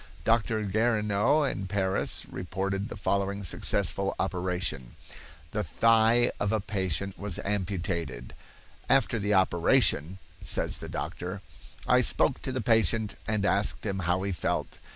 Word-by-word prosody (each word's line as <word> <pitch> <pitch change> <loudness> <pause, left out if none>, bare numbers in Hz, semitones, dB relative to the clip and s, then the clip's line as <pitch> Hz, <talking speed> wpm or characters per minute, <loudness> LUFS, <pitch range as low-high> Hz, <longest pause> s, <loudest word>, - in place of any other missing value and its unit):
Dr. 115 -1 +1
Guerineau 105 +5 +2
in 100 -8 -2
Paris 95 0 -1
reported 95 +3 -3
the - - -7
following 100 -1 -1
successful 95 +2 +1
operation: 90 -9 -2 0.6
The 105 - -1
thigh 115 +2 +3
of 100 0 0
a 110 - +1
patient 95 -1 -3
was 100 -4 -3
amputated. 90 -9 -3 0.6
"After 130 -3 +3
the 105 0 +1
operation," 85 -2 +3 0.3
says - - 0
the - - -8
doctor, 90 +3 -5 0.4
"I - - +4
spoke - - +3
to - - -4
the 130 -1 -2
patient 110 -1 +2
and 105 -2 0
asked 100 +2 +1
him 100 -2 -2
how 90 +1 0
he 100 - -2
felt. 90 - -3
100 Hz, 130 wpm, -28 LUFS, 95-110 Hz, 0.6 s, I